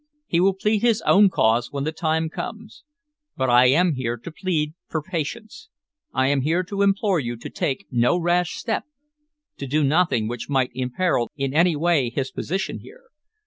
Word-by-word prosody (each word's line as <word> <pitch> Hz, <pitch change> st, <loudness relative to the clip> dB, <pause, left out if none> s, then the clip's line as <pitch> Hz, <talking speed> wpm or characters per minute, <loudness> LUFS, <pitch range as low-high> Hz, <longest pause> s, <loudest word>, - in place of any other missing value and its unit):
He 170 Hz, -, 0 dB
will 190 Hz, +1 st, +3 dB
plead 210 Hz, +2 st, 0 dB
his 235 Hz, -3 st, +2 dB
own 200 Hz, 0 st, +5 dB
cause 115 Hz, -6 st, +1 dB
when 140 Hz, -1 st, -3 dB
the 155 Hz, -, -1 dB
time 160 Hz, 0 st, -1 dB
comes. 225 Hz, +6 st, -8 dB, 0.5 s
But 130 Hz, -1 st, +1 dB
I 125 Hz, +1 st, +6 dB
am 165 Hz, +6 st, +3 dB
here 120 Hz, -3 st, -3 dB
to 145 Hz, +9 st, -9 dB
plead 155 Hz, -3 st, -2 dB
for 160 Hz, -, -2 dB
patience, 205 Hz, +8 st, -6 dB, 0.4 s
I 130 Hz, -, +1 dB
am 140 Hz, -1 st, +2 dB
here 165 Hz, +6 st, +1 dB
to 200 Hz, +2 st, -4 dB
implore 200 Hz, -2 st, +2 dB
you 120 Hz, -3 st, -3 dB
to -, -, -9 dB
take 135 Hz, -3 st, -2 dB
no 125 Hz, +7 st, +2 dB
rash 175 Hz, 0 st, +1 dB
step, 225 Hz, -, -2 dB, 0.7 s
to 140 Hz, -, -6 dB
do 150 Hz, +3 st, +1 dB
nothing 145 Hz, -7 st, +2 dB
which 120 Hz, +3 st, -6 dB
might 130 Hz, -3 st, +1 dB
imperil 125 Hz, +1 st, -1 dB
in 135 Hz, -1 st, -2 dB
any 170 Hz, +2 st, +3 dB
way 150 Hz, -5 st, +2 dB
his 135 Hz, +2 st, -3 dB
position 190 Hz, +4 st, -3 dB
here. -, -, -16 dB
160 Hz, 185 wpm, -23 LUFS, 130-185 Hz, 0.7 s, I